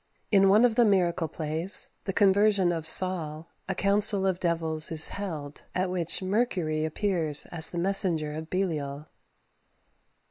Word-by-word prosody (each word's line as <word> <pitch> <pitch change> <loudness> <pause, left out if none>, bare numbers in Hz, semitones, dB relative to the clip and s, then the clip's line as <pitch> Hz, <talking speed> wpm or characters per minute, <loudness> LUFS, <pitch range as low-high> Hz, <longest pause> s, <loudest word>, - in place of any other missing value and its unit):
In 195 -2 +4
one 215 +5 +5
of 240 - +1
the 240 - +3
miracle 180 -6 +1
plays, 160 +4 0
"The 195 - -2
Conversion 200 -2 +2
of 165 -2 -2
Saul," 165 -3 +1 0.2
a 190 - -2
council 200 0 +2
of 185 -2 -1
devils 165 -2 0
is 160 -1 +2
held, 155 -8 -7
at 185 0 -1
which 175 0 +1
Mercury 185 -7 -1
appears 160 -3 -1
as 165 -2 -1
the 175 - -7
messenger 170 -5 0
of 160 +1 -8
Belial. 150 -6 -3
175 Hz, 145 wpm, -26 LUFS, 160-195 Hz, 0.2 s, one